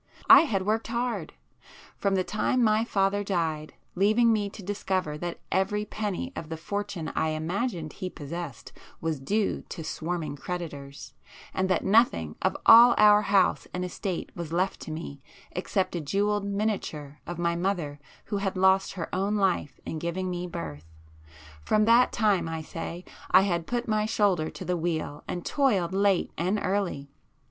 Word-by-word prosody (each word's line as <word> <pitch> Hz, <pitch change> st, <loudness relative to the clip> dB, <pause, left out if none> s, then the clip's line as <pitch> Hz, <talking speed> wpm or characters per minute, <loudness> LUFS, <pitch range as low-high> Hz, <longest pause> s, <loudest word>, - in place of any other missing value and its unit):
I -, -, +11 dB
had 195 Hz, -9 st, -1 dB
worked 220 Hz, +2 st, 0 dB
hard. 235 Hz, +1 st, -2 dB, 0.6 s
From 200 Hz, -1 st, 0 dB
the 185 Hz, -, +2 dB
time 225 Hz, +5 st, 0 dB
my 215 Hz, 0 st, +3 dB
father 200 Hz, -2 st, +1 dB
died, 160 Hz, -6 st, -2 dB, 0.2 s
leaving 215 Hz, +5 st, +4 dB
me 205 Hz, -2 st, 0 dB
to 200 Hz, -, -11 dB
discover 185 Hz, -5 st, -2 dB
that 175 Hz, 0 st, -4 dB
every 210 Hz, +2 st, +1 dB
penny 215 Hz, +5 st, -4 dB
of 160 Hz, -, -6 dB
the 160 Hz, -, -4 dB
fortune 200 Hz, -1 st, -4 dB
I -, -, 0 dB
imagined 165 Hz, -, -2 dB
he 185 Hz, -, -5 dB
possessed 150 Hz, -5 st, -7 dB, 0.3 s
was 160 Hz, -3 st, -2 dB
due 205 Hz, +10 st, 0 dB
to 165 Hz, -, -6 dB
swarming 160 Hz, -1 st, -4 dB
creditors, 145 Hz, -5 st, -6 dB, 0.4 s
and 190 Hz, 0 st, 0 dB
that 185 Hz, -, +1 dB
nothing 195 Hz, -, +3 dB
of 190 Hz, -, +1 dB
all 235 Hz, +2 st, +9 dB
our 210 Hz, 0 st, +7 dB
house 200 Hz, -3 st, +2 dB
and 180 Hz, 0 st, -2 dB
estate 180 Hz, 0 st, -4 dB
was 170 Hz, -3 st, -6 dB
left 185 Hz, +3 st, 0 dB
to -, -, -7 dB
me 155 Hz, -3 st, -7 dB, 0.3 s
except 185 Hz, 0 st, -1 dB
a 170 Hz, -, -2 dB
jewelled 205 Hz, +6 st, 0 dB
miniature 200 Hz, -8 st, -3 dB
of 175 Hz, -, -5 dB
my 170 Hz, 0 st, 0 dB
mother 170 Hz, -5 st, -2 dB, 0.3 s
who 205 Hz, -, -2 dB
had 195 Hz, -1 st, -2 dB
lost 190 Hz, +1 st, +3 dB
her 175 Hz, -4 st, -4 dB
own 195 Hz, +3 st, 0 dB
life 190 Hz, -8 st, 0 dB
in 160 Hz, -, -4 dB
giving 180 Hz, +3 st, -2 dB
me 180 Hz, 0 st, -3 dB
birth,—from 80 Hz, -, -5 dB
that 235 Hz, +2 st, +5 dB
time 205 Hz, -6 st, +1 dB
I 160 Hz, -1 st, -4 dB
say, 170 Hz, +3 st, -6 dB, 0.2 s
I 185 Hz, -, +7 dB
had 175 Hz, -4 st, -1 dB
put 240 Hz, 0 st, -2 dB
my 215 Hz, -1 st, +1 dB
shoulder 195 Hz, -8 st, +1 dB
to -, -, -8 dB
the 180 Hz, -, 0 dB
wheel 160 Hz, -3 st, -3 dB
and 175 Hz, -, -4 dB
toiled 205 Hz, -, +1 dB
late 195 Hz, -2 st, +2 dB
and 185 Hz, +5 st, +1 dB
early. 185 Hz, -9 st, -2 dB
185 Hz, 165 wpm, -27 LUFS, 160-205 Hz, 0.6 s, I